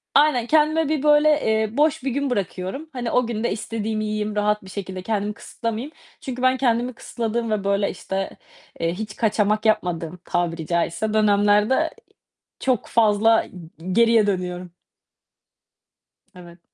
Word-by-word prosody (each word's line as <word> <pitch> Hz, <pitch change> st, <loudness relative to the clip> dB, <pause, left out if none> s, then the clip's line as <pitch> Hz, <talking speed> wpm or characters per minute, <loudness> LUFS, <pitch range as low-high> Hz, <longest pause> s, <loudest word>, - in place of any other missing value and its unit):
Aynen, 270 Hz, -6 st, +4 dB
kendime 310 Hz, +1 st, +3 dB
bir, 305 Hz, -2 st, 0 dB
böyle, 295 Hz, 0 st, +5 dB, 0.2 s
eee, 220 Hz, +2 st, 0 dB
boş 305 Hz, -2 st, +2 dB
bir 270 Hz, -, -1 dB
gün 280 Hz, +2 st, -1 dB
bırakıyorum. 200 Hz, -, -3 dB
Hani 245 Hz, -3 st, -3 dB
o 250 Hz, -2 st, +2 dB
gün 220 Hz, -2 st, -3 dB
de 240 Hz, -, 0 dB
istediğimi 215 Hz, 0 st, -3 dB
yiyeyim, 215 Hz, 0 st, -2 dB
rahat 210 Hz, 0 st, +1 dB
bir 190 Hz, -, -12 dB
şekilde 190 Hz, -1 st, -6 dB
kendimi 210 Hz, -1 st, -1 dB
kısıtlamayayım. 230 Hz, +4 st, -5 dB, 0.3 s
Çünkü 255 Hz, -2 st, -5 dB
ben 255 Hz, 0 st, +3 dB
kendimi 245 Hz, -1 st, +1 dB
kısıtladığım 230 Hz, 0 st, -3 dB
ve 210 Hz, -2 st, 0 dB
böyle 200 Hz, 0 st, +1 dB
işte, 195 Hz, 0 st, -4 dB, 0.4 s
eee, 165 Hz, 0 st, 0 dB
hiç 210 Hz, +2 st, -6 dB
kaçamak 215 Hz, -1 st, +1 dB
yapmadığım 175 Hz, -5 st, 0 dB
tabiri 170 Hz, -2 st, -1 dB
caizse 170 Hz, +5 st, -1 dB
dönemlerde 210 Hz, +1 st, +3 dB
eee 320 Hz, +3 st, +1 dB, 0.7 s
çok 255 Hz, -5 st, 0 dB
fazla 225 Hz, 0 st, +4 dB
i -, -, -14 dB
g 165 Hz, -2 st, -13 dB
geriye 230 Hz, -1 st, +4 dB
dönüyorum. 180 Hz, -2 st, -3 dB, 1.6 s
Evet. 175 Hz, -1 st, -13 dB
215 Hz, 150 wpm, -22 LUFS, 195-245 Hz, 1.6 s, böyle